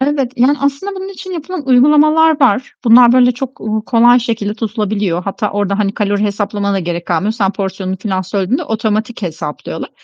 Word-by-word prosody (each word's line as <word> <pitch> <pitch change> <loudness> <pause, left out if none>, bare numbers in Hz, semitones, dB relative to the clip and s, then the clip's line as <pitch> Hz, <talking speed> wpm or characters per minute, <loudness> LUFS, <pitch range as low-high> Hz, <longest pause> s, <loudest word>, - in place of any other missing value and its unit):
Evet, 270 -2 0
yani, 260 +4 +3
aslında 280 +8 -2
bunun 380 0 -6
için 375 -1 -9
yapılan 335 -2 -6
uygulamalar 300 +4 +4
var. 255 -1 +2
Bunlar 240 +1 +7
böyle 250 0 +4
çok, 260 +2 -7
uuu, 215 0 -3
kolay 240 +1 +5
şekilde 225 -3 -3
tutulabiliyor. 210 -5 -2
Hatta 205 +2 -3
orada, 200 0 -1
hani, 200 -1 0
kalori 205 -1 -1
hesaplamana 205 0 -2
da - - 0
gerek 175 -1 -4
kalmıyor. 180 +5 0
Sen 205 -4 0
porsiyonunu 190 -1 -4
filan, 190 0 -2
söylediğinde, 195 +6 -2
otomatik 220 +1 -2
hesaplıyorlar 160 -4 -6
220 Hz, 175 wpm, -15 LUFS, 200-260 Hz, -, Bunlar